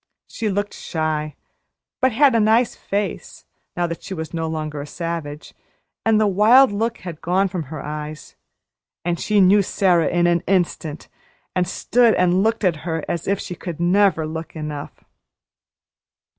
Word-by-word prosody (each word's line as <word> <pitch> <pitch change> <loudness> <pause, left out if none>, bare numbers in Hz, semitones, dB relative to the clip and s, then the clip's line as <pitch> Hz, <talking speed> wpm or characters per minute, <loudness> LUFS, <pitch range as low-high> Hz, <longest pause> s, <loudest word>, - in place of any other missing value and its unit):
She 220 -2 -3
looked 205 +1 -2
shy, 155 -2 -3 0.7
but 260 0 +4
she - - -8
had 280 -2 +5
a 230 - +3
nice 225 +2 +3
face, 200 0 -4 0.3
now 175 - +1
that 170 -1 -5
she 190 - -6
was 160 -1 -6
no 165 -1 -2
longer 155 -2 -4
a 145 - -8
savage; 165 -2 -5 0.5
and 220 -1 +3
the 215 - +3
wild 215 +7 +5
look 225 +3 -1
had 170 -4 -8
gone 185 +3 +1
from 175 -4 -4
her 155 -2 -6
eyes. 150 0 -7 0.7
And 175 -1 -1
she 210 -1 +1
knew 195 +2 +6
Sara 180 -4 +2
in 175 0 +2
an 170 -1 +2
instant, 170 -5 -1 0.5
and 180 -1 +1
stood 235 +4 +2
and 180 +1 +3
looked 225 +1 0
at 175 -5 +2
her 160 0 -4
as 170 -1 -3
if 200 0 +1
she 180 - -6
could 170 -2 -7
never 180 -1 +3
look 160 +2 -6
enough. 150 -2 -7
175 Hz, 170 wpm, -21 LUFS, 160-205 Hz, 0.7 s, knew